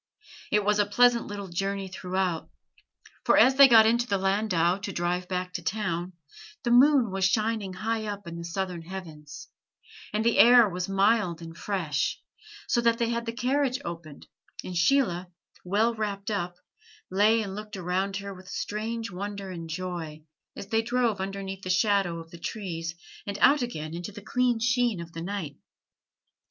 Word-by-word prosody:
It 210 -1 +2
was 210 0 +2
a 205 - +3
pleasant 240 +2 +3
little 205 -1 -6
journey 195 +2 -3
throughout; 185 -2 -2 0.7
for - - +4
as 260 - +7
they 275 +1 +9
got 225 -3 +7
into 235 +2 +2
the 200 - +1
landau 190 -2 +1
to 200 0 -5
drive 180 0 -2
back 180 0 -3
to - - -4
town, 185 -4 -2 0.5
the 240 - 0
moon 255 -2 +5
was 195 0 -2
shining 215 -1 0
high 220 +3 -2
up 205 -1 -5
in 170 0 -7
the 170 - -6
southern 180 0 -3
heavens, 165 -4 -9 0.6
and 215 +2 -1
the 235 - +3
air 240 -1 +8
was 180 0 -4
mild 195 -3 +2
and 165 -1 -9
fresh, 170 -7 -2 0.5
so 240 - +2
that 230 -1 +3
they 235 -1 0
had 235 0 -2
the - - 0
carriage 255 +2 0
opened, 165 -4 -8 0.4
and 180 - -6
Sheila, 180 -2 +2 0.4
well 210 +6 +1
wrapped 210 -2 -3
up, 175 -3 -2 0.6
lay 215 +4 +3
and 195 -2 -6
looked 210 0 -7
around 190 +2 -1
her 200 0 -6
with 185 0 -14
a - - -9
strange 225 +1 -4
wonder 200 +1 -5
and 165 -2 -7
joy 165 -3 -5 0.3
as - - -7
they 225 -1 +2
drove 235 -3 0
underneath 195 0 -5
the 185 - -6
shadow 195 -2 +2
of 165 0 -10
the 170 - -11
trees 165 -4 -5 0.3
and 200 0 -3
out 280 +6 +5
again 155 -10 -4
into 175 +4 -6
the 205 0 -11
clear 245 +1 +1
sheen 240 -3 +1
of 170 0 -8
the 165 - -6
night. 175 -6 -5
195 Hz, 175 wpm, -27 LUFS, 180-225 Hz, 0.7 s, they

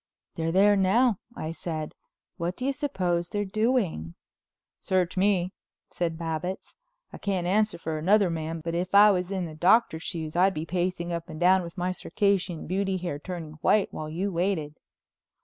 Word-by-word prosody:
"They're 165 0 -2
there 200 +3 +5
now," 200 +3 +3 0.2
I 155 - -3
said. 160 -2 -5 0.4
"What 170 +2 -2
do 255 - -4
you 275 - +1
suppose 180 - -1
they're 205 0 -1
doing?" 200 - 0 0.6
"Search 185 -2 0
me," 190 -1 +2 0.4
said 165 -2 -2
Babbitts, 165 +3 -4 0.4
"I - - -8
can't 190 -3 -1
answer 210 +4 +2
for 160 -2 -4
another 195 +2 +4
man, 165 0 -4
but 165 +1 -4
if 180 +3 -1
I 205 +1 +9
was 180 -2 -1
in 190 -2 -2
the 160 - -7
Doctor's 175 +1 +3
shoes 160 -3 -5
I'd 190 +2 +3
be 155 +1 -3
pacing 175 0 -2
up 170 +1 -5
and 155 -1 -7
down, 185 +2 +5
with 170 +1 -9
my 180 +1 0
Circassian 185 -3 0
Beauty 190 +1 -1
hair 175 -5 -4
turning 160 -3 -7
white 210 -2 +3
while 155 0 -5
you 185 +6 -2
waited." 170 -4 -1
180 Hz, 175 wpm, -27 LUFS, 165-195 Hz, 0.6 s, I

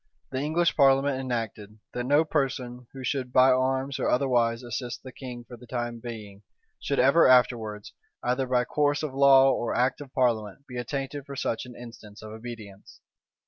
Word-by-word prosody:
The 130 - -2
English 165 +4 +1
parliament 135 -1 +3
enacted, 115 -5 -4 0.2
that 120 0 -3
no 145 +3 +4
person 125 -5 -2
who 135 -1 -9
should 130 -1 -2
by 130 +1 +6
arms, 130 +2 0
or - - 0
otherwise 120 -2 +1
assist 120 0 -5
the 130 - -9
king 125 -2 -8
for 120 0 -12
the 125 +1 -15
time 120 -1 -4
being, 110 -4 -9 0.4
should 140 - -2
ever 140 +6 +5
afterwards, 115 -5 +2 0.3
either 125 +2 0
by 125 -1 +1
course 145 +2 0
of 150 -4 -3
law 135 0 +6
or 120 - -2
act 130 +3 +1
of 140 -3 -10
parliament, 115 -1 -1
be 125 -2 -7
attainted 140 +1 -5
for 140 - -7
such 125 -1 -2
an 125 - -11
instance 115 -3 -12
of 110 - -9
obedience. 110 -3 -10
125 Hz, 180 wpm, -27 LUFS, 120-135 Hz, 0.4 s, by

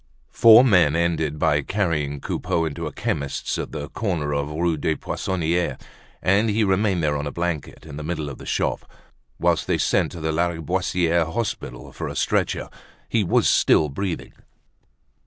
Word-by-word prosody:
Four 115 +1 +8
men 90 - +4
ended 80 -3 0
by 75 0 +2
carrying 75 -6 -1
Coupeau 85 -1 -1
into 80 +1 -4
a - - -5
chemist's, 70 0 -3
at - - -5
the 75 - -5
corner 85 -9 -2
of 70 0 -1
the 75 - -7
Rue 85 0 +1
des 80 +1 -1
Poissonniers; 85 0 -1 0.5
and 100 +4 +3
he 110 +1 +2
remained 95 -2 +1
there 75 -1 +1
on 70 0 -3
a - - -4
blanket, 85 -4 -4
in 70 - -9
the 75 - -5
middle 80 -1 -3
of 70 - -8
the - - -10
shop, - - -2 0.5
whilst - - +1
they - - +1
sent - - +1
to 85 - -7
the 80 0 -1
Lariboisiere 85 0 0
Hospital 105 - -4
for - - -5
a - - -6
stretcher. - - 0 0.4
He 110 - +2
was 85 - +2
still 75 - +4
breathing. 90 +5 -4
85 Hz, 175 wpm, -23 LUFS, 75-95 Hz, 0.5 s, Four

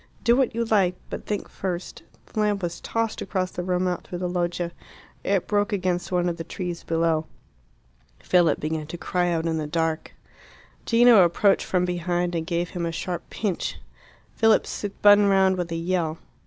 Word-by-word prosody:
"Do 235 0 +5
what 255 -3 +1
you 235 0 0
like; 195 -5 +2 0.2
but - - -6
think 205 -1 -2
first 180 -2 -5 0.2
" - - -35
The - - -6
lamp 205 -2 +1
was 170 -1 -3
tossed 230 -1 -2
across 185 -2 -2
the - - -4
room, 180 0 0
out 180 -1 -2
through 175 - -5
the 180 0 -2
loggia. 175 -1 -2 0.5
It 195 -2 +1
broke 205 0 +1
against 185 -3 -1
one 180 -1 +1
of 170 -1 -2
the 165 - -5
trees 175 +1 -5
below. 165 -1 0 0.9
Philip 175 -4 +2
began 155 0 -3
to 175 - -6
cry 175 +2 0
out 165 -1 0
in 160 -1 0
the 150 - -3
dark. 160 0 -2 0.7
Gino 230 -3 +7
approached 195 +4 +2
from 180 -1 +1
behind 175 0 -1
and 165 -1 -2
gave 175 0 -1
him 170 -2 -2
a - - -2
sharp 175 +2 -4
pinch. 200 -6 -2 0.6
Philip 225 -1 +4
spun 205 0 +3
round 190 -1 +4
with 175 -2 -3
a - - -1
yell. 165 -1 -1
180 Hz, 185 wpm, -25 LUFS, 170-195 Hz, 0.9 s, Gino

